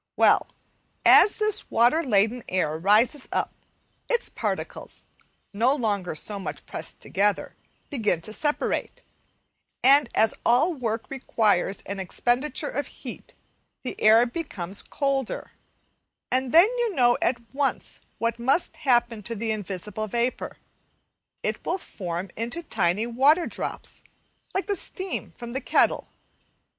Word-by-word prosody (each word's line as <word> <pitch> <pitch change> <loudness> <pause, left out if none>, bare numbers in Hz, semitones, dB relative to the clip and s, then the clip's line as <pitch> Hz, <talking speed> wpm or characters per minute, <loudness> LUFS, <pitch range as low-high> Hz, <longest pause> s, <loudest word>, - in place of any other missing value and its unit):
Well, - - +4 0.6
so - - +9
this 430 0 +1
water 245 +8 +3
laden 225 -1 +2
air 180 -5 0
rises 225 - +3
up, - - -1 0.6
its 475 -1 0
particles, - - -5 0.5
no 240 +7 +3
longer 205 - -1
so 200 +6 -4
much 190 - -6
pressed - - -7
together, 205 +1 0 0.4
begin 215 - +1
to 215 - -6
separate, 300 - -1 0.8
and 275 0 +6
as 220 - +4
all 255 +9 +4
work 230 -5 -3
requires 215 -7 +1
an 200 0 -5
expenditure 255 - 0
of 285 - -3
heat, - - -10 0.5
the 255 - -4
air 220 +3 +6
becomes 205 - -5
colder, 275 -3 -2 0.8
and 255 0 0
then 335 +3 +8
you 465 -5 0
know 240 -2 +4
at 240 - +2 0.2
once 275 0 -2 0.2
what 230 0 -1
must 275 +7 +1
happen 240 -6 +2
to 230 +3 -5
the 225 +1 -2
invisible 210 +1 -4
vapour, 235 +4 -2 0.9
it - - -2
will 355 - 0
form 180 - -6
into 240 +10 -4
tiny 190 - 0
water 280 +8 +3
drops, - - -5 0.5
like 380 - 0
the 405 - 0
steam 375 +1 -4
from 235 -1 -7
the 265 +3 -3
kettle. - - +2
240 Hz, 130 wpm, -25 LUFS, 210-285 Hz, 0.9 s, so